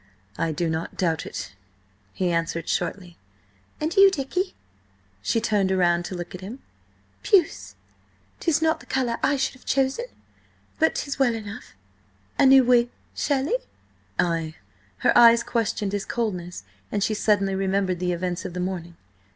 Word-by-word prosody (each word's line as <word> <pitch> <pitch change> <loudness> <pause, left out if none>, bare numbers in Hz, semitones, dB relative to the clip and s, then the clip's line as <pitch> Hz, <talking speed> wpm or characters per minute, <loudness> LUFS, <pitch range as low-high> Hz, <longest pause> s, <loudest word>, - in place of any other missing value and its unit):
"I 165 - -1
do 165 +2 -1
not 160 +1 -3
doubt 165 -3 0
it," - - -6 0.6
he 180 - -1
answered 165 -1 -1
shortly. 180 -3 -3 0.6
"And 315 +2 -2
you, 395 0 +8
Dicky?" 365 +3 -2 0.7
She 225 - +1
turned 210 -4 +1
round 175 -2 +2
to 185 - -5
look 175 -1 -6
at 180 - -8
him. 210 +7 -7 0.6
"Puce... 375 -6 +2 0.6
'tis 320 -2 +1
not 320 0 +2
the - - -16
colour 250 -3 -1
I 285 - +3
should 265 - 0
have 255 - -18
chosen, 270 - 0 0.7
but 320 - +3
'tis 280 -1 -3
well 245 -4 +3
enough. 205 - -8 0.6
A - - +6
new 265 0 +8
wig, 240 -1 +4 0.2
surely?" 285 - 0 0.6
"Ay." 165 -2 0 0.4
Her - - +2
eyes 235 0 +7
questioned 215 -3 -1
his 205 0 -2
coldness, 180 -7 -3 0.3
and 205 -1 0
she 220 - +1
suddenly 205 -2 +2
remembered 190 -1 0
the 180 0 0
events 175 0 -2
of 175 - -6
the - - -3
morning. 180 -2 -4
205 Hz, 155 wpm, -24 LUFS, 175-265 Hz, 0.7 s, you